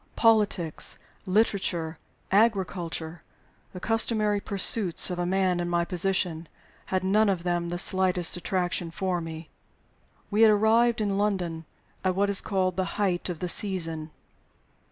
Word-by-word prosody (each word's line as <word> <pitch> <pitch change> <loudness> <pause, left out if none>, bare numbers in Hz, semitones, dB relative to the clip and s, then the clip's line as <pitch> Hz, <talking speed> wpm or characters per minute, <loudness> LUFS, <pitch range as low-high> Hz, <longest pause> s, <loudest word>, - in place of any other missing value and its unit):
Politics, 210 -8 +2 0.3
literature, 185 -5 0 0.3
agriculture 180 -6 0 0.5
the 180 - -8
customary 215 0 +2
pursuits 195 -2 +2
of 175 - -4
a 175 - -1
man 185 -1 +1
in 175 0 -2
my 170 0 0
position 180 -2 -1 0.4
had 185 -1 -1
none 205 +3 +3
of 185 -3 -1
them 175 -1 -1
the 175 - -3
slightest 185 -2 +1
attraction 175 -1 -2
for 180 +1 -2
me. 160 -1 -8 0.8
We 210 +2 +1
had 225 - +8
arrived 225 +2 +3
in 200 -1 -1
London 180 -6 -2 0.4
at 185 -1 0
what 200 +1 +1
is 195 - +4
called 185 -3 -1
"the 190 - 0
height 190 -3 -1
of 175 - -4
the 180 - -2
season." 165 -5 0
185 Hz, 140 wpm, -26 LUFS, 175-205 Hz, 0.8 s, had